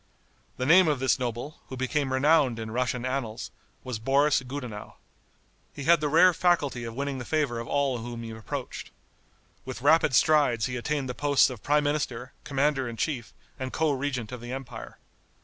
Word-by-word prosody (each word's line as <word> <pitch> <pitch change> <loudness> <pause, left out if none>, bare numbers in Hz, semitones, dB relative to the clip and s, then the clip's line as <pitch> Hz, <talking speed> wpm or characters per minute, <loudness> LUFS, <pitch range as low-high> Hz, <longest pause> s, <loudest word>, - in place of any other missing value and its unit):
The 130 - -2
name 175 +4 +6
of 150 -2 +2
this 130 0 +2
noble, 125 +4 -4
who 130 - -7
became 130 +1 -1
renowned 135 -2 +3
in 110 -1 -5
Russian 125 +1 -1
annals, 130 -4 -3 0.3
was 125 -4 -4
Boris 140 +4 +3
Gudenow. 125 -5 -7 0.8
He 140 - -6
had 170 +2 +4
the 150 - 0
rare 175 +4 +6
faculty 145 -9 +1
of 115 0 -7
winning 140 0 -3
the - - -5
favor 140 -4 -1
of 115 - -6
all 140 -3 0
whom 120 0 -6
he 115 - -6
approached. 110 -1 -6 0.7
With 130 -1 -7
rapid 150 -2 +4
strides 135 -6 +4
he 125 - -3
attained 140 +2 -2
the 125 - -3
posts 145 0 +3
of 120 -5 -9
prime 150 +1 +2
minister, 135 -4 -2
commander 135 -2 0
in 115 - -8
chief 120 -3 -2 0.3
and 130 -1 -4
co 160 -1 +1
regent 130 -4 -3
of 125 -2 -7
the 120 +1 -7
empire. 130 -2 -7
130 Hz, 185 wpm, -27 LUFS, 120-145 Hz, 0.8 s, name